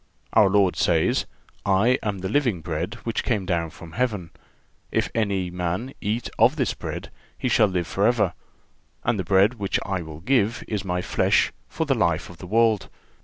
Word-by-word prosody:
Our 105 -3 +6
Lord 95 -2 +3
says: 80 -2 +2 0.4
"I 105 +7 +3
am 100 -3 -3
the 95 - -2
living 115 - +1
bread 80 +8 -3
which 115 - -2
came 105 -6 0
down 85 -3 0
from 80 +1 -12
Heaven. 105 -5 -2 0.6
If - - 0
any 100 -5 0
man 90 +9 -3
eat 110 +4 -1
of 120 +6 +5
this 130 -7 0
bread, - - -6 0.3
he - - -2
shall 115 -3 +4
live 90 -3 -1
forever; 105 +7 +2 0.7
and 110 - +1
the - - 0
bread 100 +6 +3
which 100 -1 0
I 95 -2 -1
will 80 -1 -9
give 115 +1 +1
is 105 -3 -2
My 90 -2 -2
flesh, - - +2 0.2
for 160 - -2
the 145 - +2
life 85 -8 0
of 85 - -14
the 90 - -8
world.... 110 -1 +2
100 Hz, 180 wpm, -24 LUFS, 90-115 Hz, 0.7 s, Our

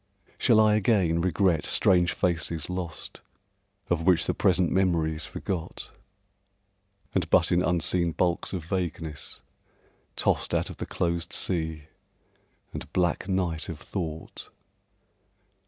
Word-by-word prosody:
Shall 110 - +5
I 110 -1 +5
again 95 -6 +2
regret 90 -2 +2
strange 90 -2 +3
faces 85 -2 -1
lost 90 -3 -5 0.7
Of 85 -2 0
which 85 0 +3
the - - 0
present 90 -3 +2
memory 85 -4 +2
is 80 0 -5
forgot 90 -4 -5 1.2
And 90 -4 0
but 85 -1 +4
in 90 0 +3
unseen 85 -1 +1
bulks 85 0 0
of 90 -4 -4
vagueness 85 -4 -4 0.7
tossed - - +1
Out - - -1
of - - -11
the - - -5
closed 85 -1 -2
sea 80 -4 0 0.9
and - - -7
black 90 +1 0
night 90 -3 -1
of 80 -3 -6
Thought? 80 -4 -6
85 Hz, 120 wpm, -27 LUFS, 80-95 Hz, 1.2 s, Shall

